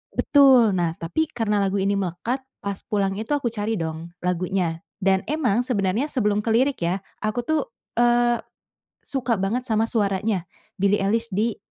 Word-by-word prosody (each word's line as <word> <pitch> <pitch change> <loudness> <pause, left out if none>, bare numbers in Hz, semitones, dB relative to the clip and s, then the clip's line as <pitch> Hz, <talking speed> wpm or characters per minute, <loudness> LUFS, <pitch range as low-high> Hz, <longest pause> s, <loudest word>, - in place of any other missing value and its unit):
betul 265 -6 +6
nah 170 -2 0
tapi 250 - -1
karena 215 -3 0
lagu 195 0 0
ini 195 +1 +1
melekat 190 +8 -2 0.2
pas 200 -1 -3
pulang 200 -3 +1
itu 225 +7 -2
aku 275 -4 -1
cari 215 0 -2
dong 165 -1 -5
lagunya, 180 -1 -1 0.2
dan 190 -1 +2
emang 260 -8 +1
sebenarnya 210 0 0
sebelum 210 -5 +1
ke 225 - +2
lirik 265 +3 +2
ya 185 +3 -1 0.2
aku 215 +3 0
tuh, 315 +5 +1 0.4
eee, 240 0 +4 0.7
suka 255 -3 -1
banget 225 +6 -1
sama 220 0 +1
suaranya 200 -3 0 0.3
Billie 200 +2 +2
Eilish 225 +4 +1
di, 215 +3 0
210 Hz, 160 wpm, -23 LUFS, 190-240 Hz, 0.7 s, betul